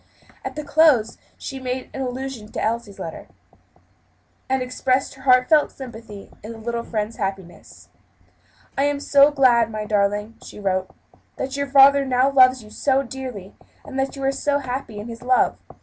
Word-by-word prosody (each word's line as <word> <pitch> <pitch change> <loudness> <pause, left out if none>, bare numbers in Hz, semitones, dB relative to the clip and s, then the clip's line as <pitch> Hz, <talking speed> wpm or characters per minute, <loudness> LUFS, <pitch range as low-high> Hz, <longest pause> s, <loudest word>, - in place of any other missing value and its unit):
At - - -6
the 300 - -5
close 285 -7 +3 0.2
she 270 - -7
made 255 0 -5
some 270 - -5
allusion 255 -3 -5
to - - -3
Elsie's 225 -2 -2
letters, 165 - -7 1.2
and 265 -1 +1
expressed 255 +1 -1
her 265 - -16
heartfelt 260 +3 +4
sympathy 225 -6 -10
in 220 +3 -8
her - - -11
little 235 +1 -3
friend's 215 0 -4
happiness. 195 -3 -6 0.9
"I 275 - +1
am 290 0 0
so 280 0 +5
glad, 250 -5 +3
my 215 -1 -5
darling," 210 +1 0
she - - -11
wrote, 190 -2 -1 0.5
"that 270 +1 -4
your 280 0 -2
father 275 0 +6
now 260 +1 +2
loves 255 -2 +5
you 210 - -15
so 270 +2 +1
dearly, 250 -7 -8 0.3
and 270 -1 -5
that 270 +1 -1
you 275 - -7
are 270 - +2
so 285 +1 0
happy 255 -5 -5
in 205 +2 -7
his 230 0 -9
love. 250 0 +2
255 Hz, 170 wpm, -22 LUFS, 220-270 Hz, 1.2 s, father